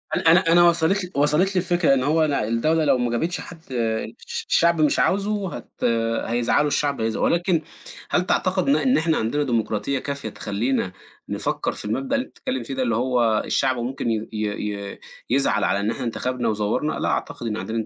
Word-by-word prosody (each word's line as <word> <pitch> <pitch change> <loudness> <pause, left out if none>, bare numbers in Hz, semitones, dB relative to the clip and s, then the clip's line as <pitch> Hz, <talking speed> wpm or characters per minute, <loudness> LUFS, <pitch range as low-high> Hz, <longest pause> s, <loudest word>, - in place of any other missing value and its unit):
أنا 165 - +3
أنا 175 - +7
أنا 175 +1 +6
وصلت 170 +4 +1
لي 180 - -7
وصلت 150 +7 +2
لي - - +4
الفكرة 175 -5 +2
إن 130 -2 +1
هو 155 +3 +3
أنا 145 -7 0
الدولة 155 +8 +1
لو 140 -3 +4
ما 125 -1 -1
جابتش 165 +9 -1
حد 165 -2 -11
الش 125 - -3
الشعب 170 -1 +3
مش 150 - +3
عاوزه 200 -1 0
هت 120 - -11 0.4
هيزعلوا 120 +5 +1
الشعب 145 -3 0
هيز 110 0 -1
ولكن 175 -1 +1 0.5
هل 180 - +1
تعتقد 185 +5 +1
إن 280 - +5
إ - - 0
إن 260 - +3
إحنا 160 0 +1
عندنا 130 +7 0
ديمقراطية 120 +1 -1
كافية 140 -4 -5
تخلينا 105 0 -2 0.4
نفكّر - - -1
في - - -9
المبدأ 130 - -1
اللي 265 -1 0
أنت - - -21
بتتكلّم 260 0 -3
فيه 135 - -5
ده، 130 -1 -1
اللي 115 -3 0
هو 120 -3 +2
الشعب 130 -1 +1
ممكن 120 +1 -3
ي 110 0 -2
ي 105 -1 -3
ي - - -15 0.3
يزعل 120 -5 +2
على 100 - +1
إن 105 +2 0
إحنا 130 - -5
انتخبنا 125 0 -2
وزوّرنا! 110 +8 -1
لأ، - - 0
أعتقد 120 - -3
إن 110 -1 -2
عندنا 110 0 -3
135 Hz, 200 wpm, -23 LUFS, 115-165 Hz, 0.5 s, أنا